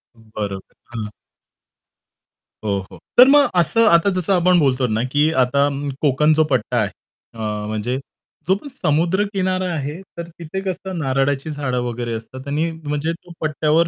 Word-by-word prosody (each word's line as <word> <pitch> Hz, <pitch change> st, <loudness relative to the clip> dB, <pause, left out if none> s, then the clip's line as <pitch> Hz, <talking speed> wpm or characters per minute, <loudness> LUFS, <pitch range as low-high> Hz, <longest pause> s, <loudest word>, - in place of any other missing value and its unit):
अं, 115 Hz, -1 st, -21 dB
बरोबर, 100 Hz, -2 st, -5 dB, 0.2 s
हं. 110 Hz, -2 st, -4 dB, 1.6 s
हो, 100 Hz, -1 st, +1 dB
हो. -, -, -11 dB, 0.2 s
तर 250 Hz, +2 st, +10 dB
मग 290 Hz, 0 st, +6 dB
असं 225 Hz, +7 st, +3 dB
आता 170 Hz, +3 st, +5 dB
जसं 185 Hz, 0 st, 0 dB
आपण 180 Hz, 0 st, +4 dB
बोलतो 130 Hz, -3 st, +2 dB
ना, 110 Hz, +1 st, 0 dB
की 150 Hz, +2 st, +3 dB
आता 130 Hz, +2 st, +3 dB
अं, 140 Hz, 0 st, -3 dB
कोकण 150 Hz, +2 st, +3 dB
जो 155 Hz, +1 st, +4 dB
पट्टा 125 Hz, -4 st, +1 dB
आहे, -, -, 0 dB, 0.4 s
अ, 115 Hz, -, -12 dB, 0.3 s
म्हणजे 110 Hz, +5 st, -2 dB, 0.5 s
जो 190 Hz, -, +4 dB
पण 285 Hz, -, -9 dB
समुद्रकिनारा 185 Hz, +4 st, +1 dB
आहे, 150 Hz, +4 st, -4 dB, 0.2 s
तर 170 Hz, 0 st, -5 dB
तिथे 170 Hz, +2 st, -6 dB
कसं 190 Hz, 0 st, -4 dB
नारळाची 135 Hz, 0 st, 0 dB
झाडं 130 Hz, -4 st, -2 dB
वगैरे 120 Hz, -1 st, -3 dB
असतात 130 Hz, +4 st, -9 dB
आणि 155 Hz, +4 st, 0 dB
म्हणजे 155 Hz, 0 st, -3 dB
तो 175 Hz, +1 st, -14 dB
पट्ट्यावर 155 Hz, +1 st, +2 dB
150 Hz, 160 wpm, -20 LUFS, 130-175 Hz, 1.6 s, तर